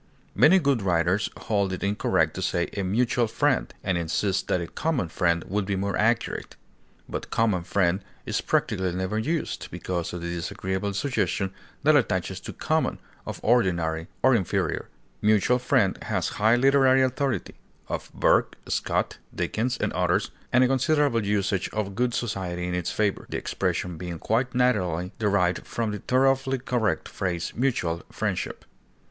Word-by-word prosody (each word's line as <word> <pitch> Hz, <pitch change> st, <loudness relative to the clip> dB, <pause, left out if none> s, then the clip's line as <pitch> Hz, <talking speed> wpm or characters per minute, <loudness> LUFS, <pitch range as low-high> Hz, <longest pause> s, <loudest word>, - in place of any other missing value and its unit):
Many 150 Hz, -, +6 dB
good 140 Hz, -, +2 dB
writers 90 Hz, +2 st, +1 dB
hold 100 Hz, -3 st, 0 dB
it 90 Hz, -, -4 dB
incorrect 100 Hz, +1 st, +1 dB
to -, -, -5 dB
say 85 Hz, 0 st, 0 dB
"a 100 Hz, -, -1 dB
mutual 120 Hz, +5 st, +1 dB
friend," 140 Hz, +4 st, +1 dB
and 95 Hz, -3 st, 0 dB
insist 95 Hz, +4 st, 0 dB
that 90 Hz, -, +1 dB
"a 85 Hz, -, -3 dB
common 135 Hz, -, -1 dB
friend" 85 Hz, 0 st, +1 dB
would 100 Hz, 0 st, -1 dB
be 100 Hz, -, 0 dB
more 100 Hz, +1 st, -1 dB
accurate; 115 Hz, +2 st, 0 dB, 0.5 s
but -, -, -5 dB
"common 110 Hz, -6 st, +1 dB
friend" 95 Hz, +1 st, +1 dB, 0.2 s
is -, -, -1 dB
practically 95 Hz, -2 st, 0 dB
never 95 Hz, +4 st, -1 dB
used, 155 Hz, +8 st, -2 dB
because 90 Hz, -2 st, -3 dB
of 90 Hz, -, -5 dB
the 85 Hz, 0 st, -3 dB
disagreeable 95 Hz, +3 st, -3 dB
suggestion 100 Hz, -6 st, -1 dB, 0.3 s
that -, -, +5 dB
attaches -, -, +1 dB
to -, -, -7 dB
common, -, -, 0 dB, 0.3 s
of -, -, -5 dB
ordinary 85 Hz, -8 st, +2 dB, 0.2 s
or 130 Hz, +1 st, +6 dB
inferior. 100 Hz, -7 st, 0 dB, 0.3 s
"Mutual 110 Hz, +4 st, +3 dB
friend" 125 Hz, -6 st, +2 dB
has -, -, 0 dB
high 110 Hz, +3 st, +3 dB
literary 135 Hz, 0 st, +5 dB
authority 130 Hz, 0 st, -1 dB, 0.3 s
(of -, -, -4 dB
Burke, -, -, +2 dB
Scott, -, -, -1 dB, 0.2 s
Dickens, 120 Hz, +4 st, -1 dB
and -, -, -1 dB
others), 90 Hz, +3 st, +1 dB, 0.2 s
and 125 Hz, +1 st, +5 dB
a -, -, +5 dB
considerable 135 Hz, -2 st, +2 dB
usage 100 Hz, -2 st, 0 dB
of 105 Hz, -2 st, -2 dB
good 120 Hz, +3 st, 0 dB
society 90 Hz, -6 st, -2 dB
in 90 Hz, -, -2 dB
its 90 Hz, -1 st, -1 dB
favor, 105 Hz, -2 st, -1 dB
the -, -, -2 dB
expression 90 Hz, -2 st, -2 dB
being 90 Hz, -2 st, -5 dB
quite 125 Hz, +8 st, 0 dB
naturally 95 Hz, -8 st, +1 dB
derived 100 Hz, -5 st, +1 dB
from 115 Hz, -2 st, -2 dB
the 105 Hz, -, -4 dB
thoroughly 135 Hz, +3 st, +2 dB
correct 125 Hz, -3 st, -1 dB
phrase 85 Hz, -3 st, -3 dB
mutual 105 Hz, -10 st, 0 dB
friendship. -, -, -3 dB
105 Hz, 155 wpm, -26 LUFS, 90-125 Hz, 0.5 s, Many